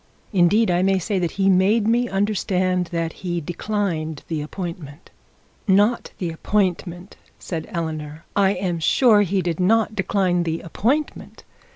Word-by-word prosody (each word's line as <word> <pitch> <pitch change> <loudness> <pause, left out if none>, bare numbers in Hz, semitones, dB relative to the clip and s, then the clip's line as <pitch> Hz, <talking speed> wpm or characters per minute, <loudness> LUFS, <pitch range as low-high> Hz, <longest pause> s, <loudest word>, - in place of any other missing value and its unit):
Indeed, 195 +3 +4
I 175 0 +2
may 195 +1 +3
say 190 +2 -1
that 175 -2 -2
he 195 -1 +2
made 195 +4 +3
me 240 +1 +2
understand 185 -3 0
that 165 -1 -3
he 175 -2 -2
declined 170 -2 -3
the 160 -2 -2
appointment.' 165 -2 -7 0.6
'Not 205 +5 +3
the 175 -3 -3
appointment,' 180 0 -2 0.2
said 165 -3 -5
Eleanor. 160 -4 -5
'I 200 -1 +3
am 175 -3 -2
sure 215 +5 +4
he 195 -1 0
did 170 -1 -2
not 215 +3 +2
decline 190 -3 +1
the 165 -1 -2
appointment. 255 - -2
185 Hz, 145 wpm, -22 LUFS, 170-205 Hz, 0.6 s, Indeed